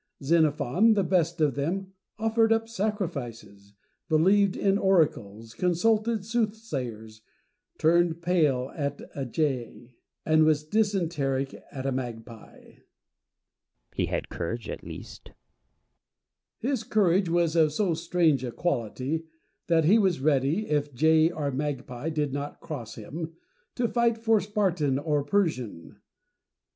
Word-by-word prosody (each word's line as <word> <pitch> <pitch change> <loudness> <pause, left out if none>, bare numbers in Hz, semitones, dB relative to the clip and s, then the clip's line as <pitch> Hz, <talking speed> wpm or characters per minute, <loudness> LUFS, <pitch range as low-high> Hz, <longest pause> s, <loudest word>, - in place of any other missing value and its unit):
Xenophon, 160 - +3
the 200 -2 +2
best 170 -2 +1
of 150 -3 +3
them, 185 +8 -3 0.2
offered 225 +1 +2
up 225 0 +2
sacrifices, 140 - -4 0.3
believed 190 +5 +4
in 200 0 +2
oracles, 115 - +1
consulted 215 - +1
soothsayers, 140 - -3 0.6
turned 170 +1 +3
pale 150 -7 +1
at 140 -2 -3
a 135 -2 -4
jay, 125 -3 -3 0.3
and 155 0 +4
was 155 -1 +3
dysenteric 165 -10 0 0.2
at 135 -1 -6
a 135 - 0
magpie. 120 -3 -6
Plato. - - -20 1.1
He - - -1
had - - -3
courage 110 +8 -4
at - - -6
least. - - -10 1.4
Diogenes. 265 +2 0
His - - -8
courage 195 -5 +2
was 170 -1 +1
of 160 -2 +4
so 180 +3 0
strange 160 -4 +1
a 125 - -3
quality, 140 +2 -2 0.4
that 165 -2 +3
he 205 +8 +5
was 190 -7 +2
ready, 145 +7 +1
if 145 -2 -1
jay 160 +4 +4
or 150 -4 -3
magpie 135 0 -4
did 150 -3 -1
not 145 +1 -5
cross 125 -8 -7
him, 160 +9 -7 0.4
to 245 -1 +1
fight 235 -1 +1
for 225 -2 +2
Spartan 180 -9 0
or 145 0 0
Persian. 140 - -2
160 Hz, 130 wpm, -27 LUFS, 135-195 Hz, 1.4 s, he